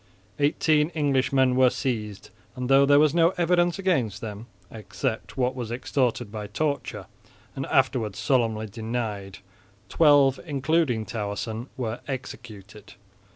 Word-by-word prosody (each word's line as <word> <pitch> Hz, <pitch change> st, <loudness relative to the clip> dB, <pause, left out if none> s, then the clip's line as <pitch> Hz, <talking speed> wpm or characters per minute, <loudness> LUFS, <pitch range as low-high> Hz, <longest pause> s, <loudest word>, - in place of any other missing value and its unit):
Eighteen 150 Hz, +2 st, +2 dB
Englishmen 135 Hz, -3 st, +2 dB
were 130 Hz, 0 st, +5 dB
seized, 105 Hz, -6 st, -4 dB, 0.2 s
and 125 Hz, 0 st, -4 dB
though 135 Hz, +1 st, +6 dB
there 145 Hz, 0 st, +6 dB
was 150 Hz, 0 st, +4 dB
no 170 Hz, +1 st, +3 dB
evidence 175 Hz, 0 st, +2 dB
against 135 Hz, -, 0 dB
them, 110 Hz, +1 st, -7 dB, 0.2 s
except 110 Hz, +4 st, -5 dB
what 125 Hz, 0 st, +1 dB
was 125 Hz, -4 st, -5 dB
extorted 120 Hz, -2 st, -1 dB
by 105 Hz, -1 st, -6 dB
torture 145 Hz, +4 st, -3 dB, 0.5 s
and 135 Hz, -, -4 dB
afterwards 125 Hz, -6 st, +1 dB
solemnly 115 Hz, -5 st, +1 dB
denied, 110 Hz, -3 st, -5 dB, 0.5 s
twelve, 145 Hz, -4 st, +4 dB
including 145 Hz, -5 st, 0 dB
Towerson, 110 Hz, +2 st, -4 dB
were 120 Hz, -2 st, -3 dB
executed. 110 Hz, -6 st, -8 dB
125 Hz, 120 wpm, -25 LUFS, 110-145 Hz, 0.5 s, though